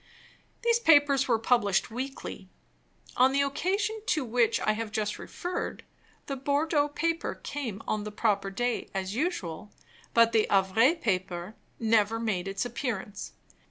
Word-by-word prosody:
These 470 0 +3
papers 290 - +5
were 235 -3 +3
published 220 -4 +2
weekly. 265 +4 -6 0.7
On 260 +2 +5
the 280 0 +3
occasion 395 +10 -1
to 305 -5 +1
which 235 0 +2
I - - +2
have 215 0 -3
just 210 -1 -2
referred, 355 +1 -5 0.4
the 275 - -3
Bordeaux 290 +2 +1
paper 330 +3 -2
came 235 -8 -5
on 215 -1 -1
the 210 - -5
proper 205 -2 0
day, 240 +5 -2
as 190 0 -2
usual; 210 - -3 0.4
but 230 0 +6
the 220 -2 +3
Havre 200 - +4
paper 185 - -2 0.3
never 225 -1 +2
made 200 -5 -1
its 195 +2 -2
appearance. 230 -4 -4
230 Hz, 140 wpm, -28 LUFS, 205-285 Hz, 0.7 s, but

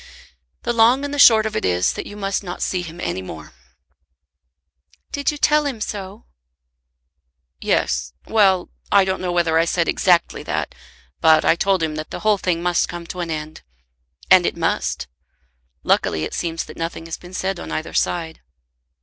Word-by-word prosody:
"The 240 - 0
long 240 +5 +4
and 285 - -5
the 290 - -3
short 220 -5 +7
of 215 0 -3
it - - -1
is 90 0 +1
that - - -6
you 205 - -9
must 195 -1 -2
not 180 -1 -5
see 185 - -1
him 170 -1 -9
any 90 +1 -3
more." 80 -4 -10 1.6
"Did 285 0 -1
you 295 - -7
tell 300 0 +3
him 255 -5 -4
so?" 205 0 -6 1.3
"Yes; - - 0
well; 195 -5 +2 0.2
I 200 -1 +5
don't 190 0 -2
know 180 -1 -2
whether 170 -2 +2
I 165 - +3
said 170 0 0
exactly 175 -2 +2
that, - - -3 0.5
but 160 -1 +5
I - - +5
told 190 -1 +1
him 155 -1 -2
that 155 - -5
the - - -7
whole 215 -2 +2
thing 175 -2 -1
must 175 -1 +1
come 175 -1 -6
to 180 - -7
an 170 -1 -3
end. 155 0 -5 0.7
And - - +7
it - - -3
must. - - -1 0.8
Luckily 80 -1 +1
it - - -4
seems 165 -1 -2
that - - -12
nothing 165 0 -4
has 165 - -5
been 180 +1 -11
said 190 -1 -2
on - - -7
either 155 - -4
side." 165 -2 -1
175 Hz, 185 wpm, -21 LUFS, 160-205 Hz, 1.6 s, short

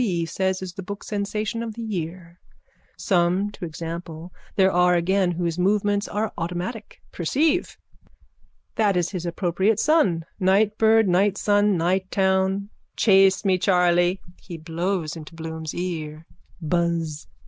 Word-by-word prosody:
B. 175 -7 0
says 190 +2 -1
is 180 -2 -6
the 195 - -7
book 200 +2 -7
sensation 210 +2 -3
of 225 -2 -5
the 230 - -6
year. 175 -3 -6 0.6
Some, 185 +3 +1
to 205 - -7
example, 165 +1 -7 0.2
there 190 -1 +4
are 180 0 +4
again 180 +1 +1
whose 170 0 -2
movements 205 +2 +1
are 210 0 -2
automatic. 180 +7 -5
Perceive. 300 - 0 1.0
That 205 -4 +2
is 175 -1 0
his 180 -3 -4
appropriate 190 +5 0
sun. 210 - +2
Nightbird 215 +3 +3
nightsun 205 +2 +2
nighttown. 190 +2 0 0.3
Chase 195 -1 +4
me, 185 -2 +2
Charley! 180 0 +3 0.2
(He 175 -3 -8
blows 165 +1 -3
into 160 0 -10
Bloom's 160 -1 -6
ear.) 160 -3 -5 0.3
Buzz! 165 -2 -1
185 Hz, 125 wpm, -23 LUFS, 170-200 Hz, 1.0 s, there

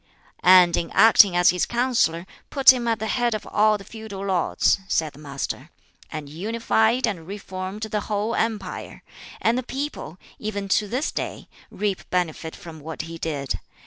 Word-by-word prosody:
"And 180 -2 +7
in 170 - -2
acting 210 -4 +7
as 175 0 +5
his 180 -1 0
counsellor 235 -9 +1 0.2
put 270 -2 +7
him 240 -2 -3
at 230 -1 +1
the 220 - -4
head 240 0 0
of 215 - -6
all 215 0 +3
the 200 - -12
feudal 210 -2 -8
lords," 190 0 +2
said 155 -5 0
the - - -15
Master, 140 -2 -5 0.4
"and 155 -2 -6
unified 220 - +1
and 180 -8 -4
reformed 190 +1 -6
the 215 -1 -2
whole 210 +2 -1
empire; 215 -6 -3 0.4
and 235 +3 +2
the - - -2
people, 265 - -5 0.2
even 205 -2 -4
to 210 +2 +2
this 255 +8 -2
day, - - -5 0.2
reap 200 -2 -3
benefit 165 -2 -2
from 165 -2 -11
what 160 +2 -6
he 165 0 -8
did. 145 -5 -3
200 Hz, 170 wpm, -24 LUFS, 170-225 Hz, 0.4 s, And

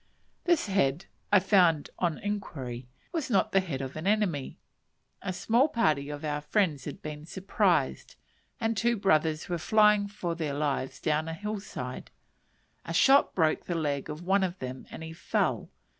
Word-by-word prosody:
This 345 -3 +3
head, 180 -6 +1 0.3
I 205 - +7
found 180 -6 +3
on 170 -4 0
inquiry, 135 -12 -5 0.2
was 320 -6 -2
not 200 -5 +2
the 195 - +5
head 160 -8 -3
of 135 0 -6
an 155 +4 -4
enemy. 200 -10 0 0.6
A 195 - -3
small 235 +9 +2
party 155 - +1
of 145 +1 -6
our 150 -1 -2
friends 150 - 0
had 145 - -7
been 150 -1 -6
surprised, 190 +2 0 0.4
and 225 0 0
two 235 +3 +1
brothers 160 -5 +2
were 175 -1 -2
flying 210 +2 +4
for 185 -4 -4
their 155 -4 -3
lives 140 -3 -2
down 155 +1 0
a 165 - -4
hill 210 +3 -4
side; 125 -10 -7 0.7
a 165 - -5
shot 275 +9 +5
broke 160 -3 +2
the 175 - -2
leg 145 -4 -2
of 150 +3 -6
one 190 +2 +3
of 185 -1 -2
them 130 -2 -7
and - - -8
he 160 0 -7
fell. - - -1
170 Hz, 175 wpm, -29 LUFS, 150-205 Hz, 0.7 s, I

